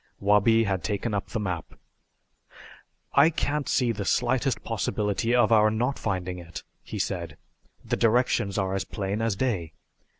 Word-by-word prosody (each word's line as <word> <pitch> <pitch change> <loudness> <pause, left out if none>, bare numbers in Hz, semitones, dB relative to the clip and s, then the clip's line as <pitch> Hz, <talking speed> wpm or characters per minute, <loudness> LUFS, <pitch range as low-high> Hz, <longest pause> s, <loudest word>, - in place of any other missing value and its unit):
Wabi 105 +3 +4
had 95 -4 -1
taken 105 +1 -2
up 100 - -2
the 115 - -4
map. 90 -5 -4 1.4
"I 140 +3 +6
can't 150 -2 -2
see 125 -2 +2
the 105 -2 -4
slightest 125 +3 0
possibility 110 +2 -1
of 120 -2 +4
our 110 -1 +6
not 120 +5 -1
finding 90 -3 -3
it," 85 -1 -9 0.2
he - - -7
said. 85 -5 -3 0.5
"The - - -1
directions 115 -4 +2
are 95 -1 0
as 95 - -1
plain 100 +1 -3
as 115 -3 0
day. 95 - -2
105 Hz, 155 wpm, -26 LUFS, 95-120 Hz, 1.4 s, I